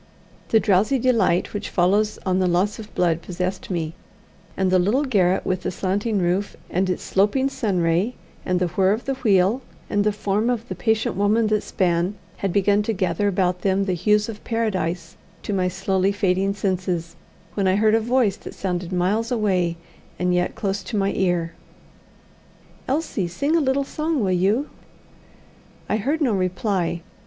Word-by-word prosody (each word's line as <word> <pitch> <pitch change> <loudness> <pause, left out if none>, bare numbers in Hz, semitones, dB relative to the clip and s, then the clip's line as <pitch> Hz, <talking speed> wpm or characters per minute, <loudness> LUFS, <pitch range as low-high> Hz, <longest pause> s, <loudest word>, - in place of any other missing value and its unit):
The 225 - +5
drowsy 210 +6 +3
delight 230 -8 +2
which 205 0 -4
follows 205 +4 +2
on 185 -1 +1
the 185 - +2
loss 185 +5 +1
of 220 -1 -10
blood 170 -2 +1
possessed 180 +2 -4
me, 165 -3 -2 0.6
and 190 -1 +1
the 185 - +4
little 215 +11 +2
garret 190 -9 +2
with 185 0 -1
the - - -2
slanting 200 +4 -1
roof, 185 +2 0
and 185 +2 +1
its 180 - -2
sloping 210 +8 +2
sun 205 -9 -1
ray, 170 +8 +1 0.3
and 180 -1 0
the 180 -1 0
whirr 190 +3 +2
of 220 - -4
the 270 - 0
wheel, 215 -2 +2 0.3
and 205 0 +2
the 210 - +2
form 205 +2 0
of 240 -1 -2
the - - -2
patient 220 -3 0
woman 205 +4 +2
that 215 -1 +2
span, 175 +1 0 0.2
had 195 - -1
begun 200 +2 +3
to 225 +2 -1
gather 185 0 0
about 180 -2 0
them 195 0 +1
the 190 - 0
hues 210 +4 +2
of 220 -2 -8
Paradise 190 -7 -2 0.3
to 205 - -3
my 185 -2 +1
slowly 190 +1 0
fading 195 0 +1
senses, 185 -4 -2 0.4
when 195 -2 0
I 185 - +3
heard 215 +1 +3
a 225 - +5
voice 230 -3 +1
that - - -10
sounded 180 -2 -3
miles 200 +6 0
away, 185 -7 +1 0.4
and 180 0 +1
yet 180 0 0
close 195 -1 -2
to 200 +4 -4
my 195 0 +1
ear: 175 -3 0 1.3
"Elsie, 265 - -1
sing 280 - 0
a 335 - +3
little 275 0 +1
song, 305 -1 -1
will 190 - +1
you?" 200 +10 +1 1.2
I 215 - +1
heard 285 +9 -1
no 255 -7 +2
reply. 185 -2 -1
195 Hz, 180 wpm, -23 LUFS, 180-215 Hz, 1.3 s, The